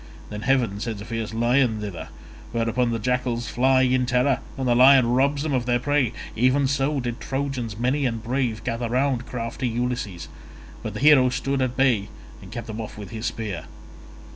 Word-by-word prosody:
Then 105 0 -5
heaven 120 -6 +1
sends 110 -1 -4
a 100 - -8
fierce 115 -2 -4
lion 120 0 +2
thither, 100 -6 -6 0.4
whereon 115 +1 +1
the 115 - -1
jackals 125 0 -1
fly 130 +1 +3
in 130 -1 +2
terror 125 +1 +2 0.2
and 130 -1 -2
the 120 - +4
lion 130 +1 +7
robs 140 +3 +2
them 155 -3 -1
of 125 -2 0
their 120 0 +3
prey—even 130 0 +1
so 140 +1 0
did 120 -2 -4
Trojans 135 -6 -3
many 130 +4 +1
and 115 -2 -4
brave 120 -3 -1
gather 115 0 -2
round 125 0 0
crafty 120 +1 -3
Ulysses, 120 -6 -3 0.5
but - - -6
the - - -4
hero 140 -3 +6
stood 135 +2 -1
at 130 -1 -1
bay 120 -7 +2 0.3
and - - -12
kept 120 - -6
them 110 0 -5
off 110 - -8
with 105 +1 -8
his 110 +1 -3
spear. 105 -7 -4
125 Hz, 185 wpm, -24 LUFS, 115-130 Hz, 0.5 s, lion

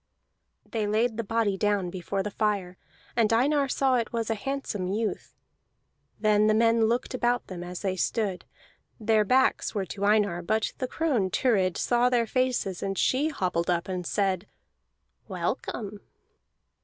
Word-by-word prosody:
They 220 -2 -2
laid 220 +2 +1
the 230 - -1
body 215 -2 0
down 205 -4 +1
before 190 +2 -3
the 210 - -4
fire, 200 -4 -1 0.4
and 230 -2 +3
Einar 275 +5 +3
saw 265 -1 +2
it 230 -2 -2
was 230 -1 -2
a - - +3
handsome 220 -5 -3
youth. 210 +3 -3 0.8
Then 215 0 +3
the 215 - +4
men 230 0 +4
looked 240 +4 0
about 245 -1 0
them 175 -2 -7
as 180 0 -6
they 190 -2 0
stood; 195 0 -1 0.6
their 220 -1 +3
backs 255 +2 +2
were 200 -2 -1
to 195 +2 -6
Einar, 205 -4 +2
but 215 +5 0
the 255 - -1
crone 255 -10 0
Thurid 190 -4 +1
saw 245 0 +2
their 240 -2 +2
faces, 250 -7 -1
and 195 -1 -2
she 285 +4 +2
hobbled 180 - -1
up 175 0 0
and 180 -2 -3
said 195 -1 0 0.8
"Welcome!" 210 -2 -4
215 Hz, 155 wpm, -27 LUFS, 195-235 Hz, 0.8 s, the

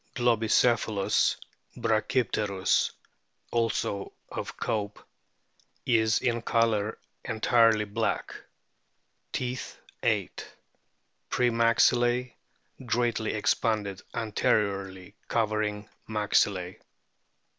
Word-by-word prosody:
Globicephalus 115 -3 +2 0.4
brachypteriis, 110 -3 +1 0.6
also 115 -4 -1 0.2
of - - -6
Cope,* 105 -1 -2 0.9
is 110 -3 +3
in 120 -2 0
colour 110 -2 +1 0.3
entirely 115 -1 +3
black. 110 +2 -2 1.0
Teeth, 125 0 -4 0.2
8. - - -1 0.9
Pre 125 -1 +2
maxillae 120 +2 +3 0.5
greatly 120 -2 0
expanded 105 -2 0
anteriorly, 100 -4 -1
covering 105 -2 -1 0.2
maxillae. 100 -4 +1
110 Hz, 65 wpm, -28 LUFS, 105-115 Hz, 1.0 s, is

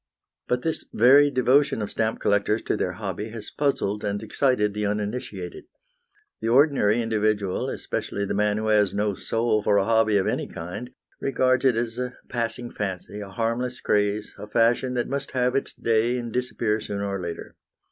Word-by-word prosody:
But 125 0 0
this 160 -1 -2
very 140 +5 +6
devotion 135 +1 +3
of 105 - -3
stamp 110 0 -1
collectors 105 +2 +1
to - - 0
their - - -1
hobby 105 +2 -5
has 110 -1 -8
puzzled 105 -8 -1
and 100 0 -2
excited 110 -2 +1
the 105 0 -1
uninitiated. 105 -3 -4 0.8
The 110 - -2
ordinary 120 -4 +4
individual, 105 -3 0
especially 100 - -3
the - - -2
man 105 0 +1
who 110 0 -1
has 105 -2 +3
no 105 0 +1
soul 115 +1 0
for 105 0 +3
a 100 - +3
hobby 110 -2 +3
of 95 - +1
any - - -1
kind, 90 +9 -7 0.3
regards 130 -1 +1
it 130 -3 +5
as 115 +1 -2
a 125 0 -3
passing 120 0 -3
fancy, 100 0 -4
a 100 -1 -7
harmless 120 +4 -2
craze, 105 0 0
a 105 - -7
fashion 120 +3 +2
that 120 - 0
must 140 +1 -4
have 125 0 +1
its 135 - -1
day 115 +2 +1
and 120 -2 -5
disappear, 115 -3 -1
sooner 100 -1 -3
or 100 -1 -3
later. 85 -1 -6
110 Hz, 175 wpm, -25 LUFS, 105-125 Hz, 0.8 s, very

